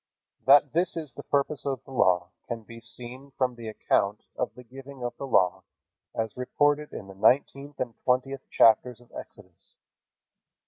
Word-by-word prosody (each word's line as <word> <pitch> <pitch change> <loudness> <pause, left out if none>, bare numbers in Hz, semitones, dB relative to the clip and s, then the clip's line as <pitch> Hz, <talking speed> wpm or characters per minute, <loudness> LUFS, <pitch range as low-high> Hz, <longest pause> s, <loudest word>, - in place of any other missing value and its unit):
That 140 0 +7
this 175 +2 +1
is 155 -5 -5
the - - -9
purpose 145 0 0
of 135 -2 -3
the - - -13
Law 90 -7 +2 0.2
can 115 -2 -4
be 115 +1 -12
seen 125 +3 -8
from 130 -2 +1
the 120 -2 -9
account 105 -1 0
of - - -3
the 125 - -11
giving 135 +2 -11
of 120 - -3
the 140 - -5
Law 90 -8 +3 0.5
as 110 -1 -2
reported 145 +4 +1
in - - -7
the 95 - -11
nineteenth 140 +7 +2
and 120 -2 -2
twentieth 130 +2 +1
chapters 115 +2 +4
of 120 0 -21
Exodus. 95 -5 -12
125 Hz, 170 wpm, -27 LUFS, 115-140 Hz, 0.5 s, That